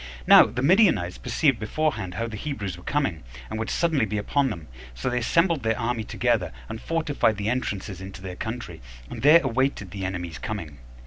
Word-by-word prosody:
Now - - +8
the 120 +4 -4
Midianites 165 - +3
perceived 140 -7 +1
beforehand 110 -5 -2
how 115 - -2
the 115 -2 -6
Hebrews 105 - -4
were 90 - -13
coming, 135 - -1 0.3
and 110 - -3
would 110 - -3
suddenly 155 -9 +1
be 105 +1 -2
upon 135 +6 +1
them: 85 -8 -7 0.3
so - - -2
they 125 - 0
assembled 165 +5 +2
their 115 -1 0
army 115 -1 -1
together, 110 -7 0 0.2
and 110 0 -7
fortified 150 -9 0
the 105 +1 -1
entrances 100 -6 -3
into 95 0 -8
their 90 -1 -6
country, 110 - -6 0.3
and - - -6
there 155 +4 +7
awaited 130 -6 -1
the 100 -1 -6
enemy's 90 -4 -4
coming. 80 - -6
110 Hz, 190 wpm, -25 LUFS, 95-135 Hz, 0.3 s, Now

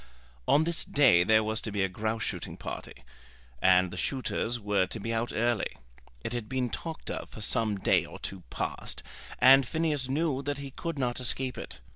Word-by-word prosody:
On 150 +3 +5
this 170 +1 +1
day 125 -12 +5
there 110 +3 +4
was 110 0 -1
to 110 - -4
be 100 -1 0
a - - +2
grouse 110 +4 -2
shooting - - -4
party, - - -7 0.6
and 90 -1 +5
the 90 - -7
shooters 120 0 -1
were 100 -3 +1
to 110 - -5
be 115 +3 -3
out 115 +1 -1
early. 115 -1 0 0.5
It 115 - -3
had 120 -3 -4
been 130 -2 -1
talked 165 -1 -5
of - - -5
for - - -10
some 105 -1 +1
day - - +3
or - - -9
two 95 -2 -6
past, - - -3 0.3
and 135 +1 +8
Phineas 150 -1 0
knew 145 -1 0
that 145 0 -2
he 140 -1 -7
could 165 +3 -5
not 125 -2 0
escape 130 +1 -2
it. - - -8
120 Hz, 195 wpm, -29 LUFS, 105-135 Hz, 0.6 s, and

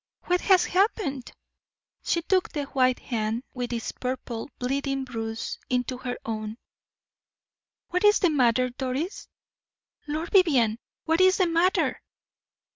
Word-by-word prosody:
What 360 0 +1
has 375 -2 +5
happened?" 360 - 0 0.7
She 335 - 0
took 370 +1 +1
the 295 - -3
white 255 -2 +2
hand, 225 0 -2
with 245 -1 -4
its 230 -2 -3
purple, 250 -2 -5
bleeding 275 +1 -1
bruise, 225 -3 -5
into 250 0 -1
her 245 -1 -4
own. 215 0 -4 1.3
"What 360 +2 -1
is 415 0 +6
the 360 - +2
matter, 255 -2 +3
Doris? 265 - -4 0.8
Lord 310 +3 -3
Vivianne, 260 - +4 0.2
what 325 +2 +2
is 375 0 +5
the 370 - +3
matter?" 340 +2 +1
265 Hz, 125 wpm, -26 LUFS, 245-345 Hz, 1.3 s, is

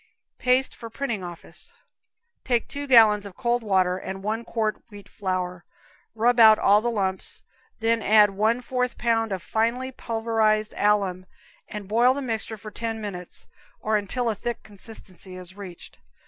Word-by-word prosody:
Paste 255 +1 +2
for 230 - -9
Printing 230 -5 -3
Office. 175 -2 -8 0.7
Take 240 -3 0
two 285 0 -6
gallons 220 -5 +6
of 200 -2 -10
cold 240 0 0
water 185 -4 +2
and 190 +1 -6
one 220 +3 -2
quart 220 -2 -2
wheat 205 -2 -12
flour, 180 -2 -3 0.5
rub 240 +2 +2
out 220 -1 +9
all 205 +1 +4
the 240 - 0
lumps, 190 -4 -3 0.4
then 225 0 +2
add 210 -1 +5
one 220 +5 +1
fourth 250 0 -2
pound 225 -2 +1
of 190 -2 -3
finely 235 +4 -1
pulverized 225 -3 0
alum 195 -3 +1 0.4
and 210 -2 -7
boil 240 +5 +4
the 280 - -3
mixture 225 -2 -3
for 215 +1 -10
ten 225 +1 -4
minutes, 185 -5 -7 0.3
or 215 0 0
until 215 +4 -1
a 225 - +2
thick 235 +3 -5
consistency 195 -3 -11
is 185 0 -10
reached. 190 -4 -11
215 Hz, 160 wpm, -25 LUFS, 195-235 Hz, 0.7 s, out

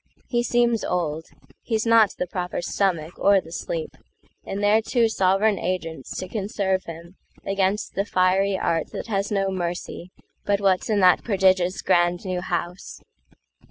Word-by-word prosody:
He 240 -1 +1
seems 240 -2 +1
old; 160 -3 -2 0.3
He's 220 -1 -1
not 230 -3 +4
the - - -1
proper 180 0 -4
stomach 175 -4 -1
or 200 0 +5
the 165 -3 -11
sleep—And 465 - -7
they're 210 +2 +4
two 230 +1 +2
sovran 195 0 +2
agents 165 -6 -4
to 185 - -4
conserve 195 -2 -2
himAgainst 190 +4 -4
the 195 - 0
fiery 190 0 +2
art 165 -3 0
that - - -5
has 200 -2 -1
no 195 -1 +1
mercyBut 180 +2 -4
what's 195 -1 +1
in 210 -2 +2
that 180 -1 +5
prodigious 190 -3 +2
grand 175 0 +2
new 185 -1 -2
House. 175 0 -5
190 Hz, 140 wpm, -24 LUFS, 180-205 Hz, 0.3 s, or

